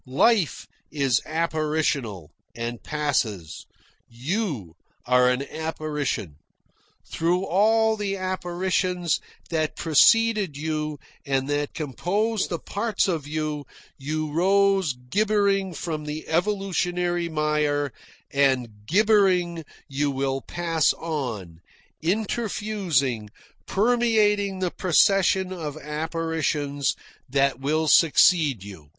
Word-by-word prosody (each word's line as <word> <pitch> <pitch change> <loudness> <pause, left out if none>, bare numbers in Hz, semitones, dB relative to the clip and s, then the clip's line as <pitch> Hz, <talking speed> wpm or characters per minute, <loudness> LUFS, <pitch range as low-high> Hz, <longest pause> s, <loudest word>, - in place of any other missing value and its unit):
Life 175 - +2 0.3
is 140 -5 +1
apparitional, 155 - -1 0.2
and 120 0 -4
passes. 115 - -2 0.4
You 130 - -3 0.3
are 125 0 +4
an 125 +2 0
apparition. 150 - -3 0.7
Through 175 +3 +1
all 220 +4 +3
the 200 -2 -2
apparitions 180 -1 -1 0.3
that 155 -2 -1
preceded 205 +1 +4
you 155 0 -3 0.3
and 135 -1 -1
that 145 0 -2
compose 190 - -1
the 170 - -3
parts 210 +7 -1
of 160 -6 -2
you, 150 -2 -3 0.3
you 155 +2 -3
rose 195 -1 +3
gibbering 195 +8 +1
from 155 -3 -4
the 150 +1 -6
evolutionary 175 -1 0
mire, 150 -2 0 0.4
and 135 -4 +2 0.2
gibbering 185 -4 +3 0.2
you 145 +1 -1
will 135 0 -1
pass 165 -1 +1
on, 120 - -5 0.4
interfusing, 190 - -1 0.4
permeating 210 -3 +2
the 180 -2 0
procession 190 +1 +3
of 155 -4 -5
apparitions 150 -2 -2 0.3
that 135 -1 +1
will 155 +3 0
succeed 155 - +4
you." 90 -8 -11
160 Hz, 95 wpm, -24 LUFS, 140-190 Hz, 0.7 s, are